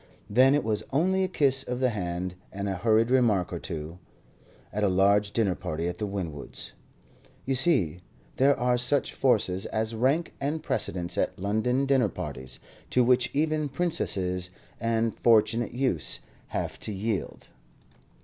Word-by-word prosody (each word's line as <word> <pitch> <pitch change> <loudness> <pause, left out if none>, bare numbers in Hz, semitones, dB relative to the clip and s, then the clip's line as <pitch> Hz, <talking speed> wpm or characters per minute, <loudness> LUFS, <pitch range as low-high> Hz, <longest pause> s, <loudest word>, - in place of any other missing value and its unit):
Then 130 +5 +5
it 145 - +1
was 110 -1 0
only 185 +7 +2
a - - +1
kiss 140 -6 +3
of 125 -1 -4
the 130 -1 +3
hand 90 -3 -3 0.2
and 100 +1 -4
a 95 - -1
hurried 110 +4 +2
remark 110 -9 +2
or 85 - -3
two, 80 +1 -6 0.7
at 105 +1 -1
a - - +4
large 100 +2 +3
dinner 105 -5 +1
party 80 0 -4
at 90 0 -4
the 105 - -2
Winwoods'. 85 -8 -5 0.7
You 135 - 0
see, 125 - +2 0.4
there 140 +2 +4
are 125 0 +2
such 130 +3 +1
forces 100 -7 +1
as 110 +1 -1
rank 135 +9 +1
and 150 +3 -2
precedence 90 - 0
at - - -1
London 110 +7 0
dinner 135 -6 +3
parties, 65 -6 -6 0.3
to 125 - +3
which 125 0 +3
even 155 0 0
princesses 95 - 0 0.3
and 115 0 0
fortunate 115 +1 +3
youths 125 - 0 0.3
have - - -4
to - - -3
yield. 105 0 -3
115 Hz, 155 wpm, -27 LUFS, 95-135 Hz, 0.7 s, Then